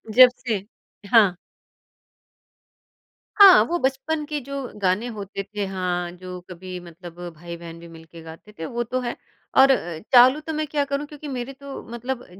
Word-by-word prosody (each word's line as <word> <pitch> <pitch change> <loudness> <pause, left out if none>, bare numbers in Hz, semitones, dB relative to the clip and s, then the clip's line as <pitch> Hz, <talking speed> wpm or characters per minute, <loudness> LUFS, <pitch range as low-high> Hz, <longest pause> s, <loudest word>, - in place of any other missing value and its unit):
जब 255 -1 +10 0.2
से 205 -4 -1 0.5
हाँ। 205 -6 +6 2.0
हाँ, 390 -3 +10
वो 345 - -1
बचपन 270 +4 -1
के 295 0 -3
जो 275 +2 -5 0.2
गाने 195 +5 +1
होते 200 -3 -6
थे 205 0 -4
हाँ 180 -2 -2
जो 180 0 -9
कभी 180 0 -8
मतलब 175 0 -12 0.2
भाई-बहन 170 0 -9
भी 170 - -12
मिलके 165 0 -13
गाते 165 +6 -12
थे 165 - -4
वो 240 +5 -3
तो 255 +2 -2
है। 240 - -3 0.4
और 270 +1 +8
अ, 175 -10 -1
चालू 255 +3 +7
तो 315 +1 -6
मैं 310 0 -1
क्या 290 0 0
करूँ 280 +1 -3
क्योंकि 295 0 -10
मेरे 260 -1 -5
तो 280 0 -9
मतलब 245 +1 -5
225 Hz, 165 wpm, -23 LUFS, 180-275 Hz, 2.0 s, जब